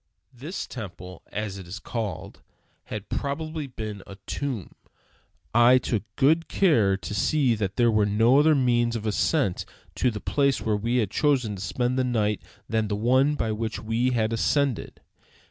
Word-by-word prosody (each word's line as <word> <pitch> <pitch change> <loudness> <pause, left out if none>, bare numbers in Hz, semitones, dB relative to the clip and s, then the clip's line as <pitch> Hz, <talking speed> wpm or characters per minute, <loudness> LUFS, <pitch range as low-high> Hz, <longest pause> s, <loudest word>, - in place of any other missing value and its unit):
This 145 +10 -6
temple, 90 -6 -9
as 105 -2 -4
it 90 - -10
is 95 +4 -6
called, 105 -4 -5 0.4
had 105 -1 -6
probably 155 +1 -3
been 110 -5 -6
a 100 - -9
tomb. 130 -10 -4 0.8
I 120 +2 +6
took 115 -4 -1
good 160 +4 +3
care 115 - +3
to 100 - -6
see 130 +5 +2
that 100 -3 -2
there 120 -1 +3
was 105 -1 +2
no 115 +6 +4
other 155 +1 +5
means 120 -3 +2
of 110 -1 -4
ascent 110 - +1 0.3
to 125 - +1
the 105 -3 -5
place 140 +2 +1
where 110 -1 0
we 115 +4 -1
had 105 -5 0
chosen 130 -7 +1
to 95 - -8
spend 125 +4 -1
the - - +2
night 110 -4 0 0.3
than 110 -1 0
the 105 - -1
one 130 +7 +3
by 115 -6 -1
which 110 +1 -3
we 115 +3 0
had 115 -3 0
ascended. 140 +1 0
115 Hz, 170 wpm, -25 LUFS, 105-130 Hz, 0.8 s, I